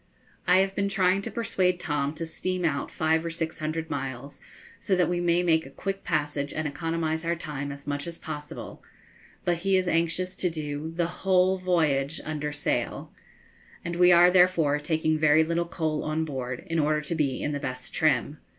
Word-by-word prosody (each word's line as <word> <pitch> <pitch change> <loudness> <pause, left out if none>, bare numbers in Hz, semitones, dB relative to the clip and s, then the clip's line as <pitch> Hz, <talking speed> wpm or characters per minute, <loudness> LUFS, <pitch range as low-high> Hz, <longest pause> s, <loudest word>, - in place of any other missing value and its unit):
I 180 +1 +6
have 195 0 0
been 200 0 0
trying 190 0 +2
to - - -5
persuade 185 -6 0
Tom 145 -2 -1
to 165 - -4
steam 185 +2 -2
out 140 -3 0
five 160 0 +1
or 170 - -2
six 165 -1 -4
hundred 160 +1 -3
miles, 135 +1 -5 0.4
so 195 - +1
that 180 -3 +3
we 175 0 0
may 175 0 +2
make 160 -2 +3
a - - -11
quick 195 +7 -4
passage 145 -3 -1
and 155 0 -2
economise 160 +2 -2
our 170 +1 0
time 145 -3 -5
as 140 0 -10
much 145 +2 -3
as 170 -1 -6
possible, 150 -2 -7 0.6
but 175 -1 +2
he 195 +1 +2
is 185 -1 0
anxious 170 +2 0
to 180 - +1
do 150 -1 -4
the 170 0 +1 0.2
whole 190 0 +3
voyage 160 -5 +1
under 150 -1 -3
sail, 145 0 -2 0.7
and 170 0 -3
we 180 +1 +6
are 175 +1 +7
therefore 180 -5 +4
taking 155 0 0
very 155 0 +5
little 170 +1 0
coal 155 -3 -2
on 155 +1 -1
board, 130 -4 -4
in 165 -3 -1
order 150 0 +2
to 150 - -4
be 150 -5 0
in 145 - -2
the 145 - -2
best 130 -2 -6
trim. - - +1
160 Hz, 195 wpm, -27 LUFS, 150-180 Hz, 0.7 s, are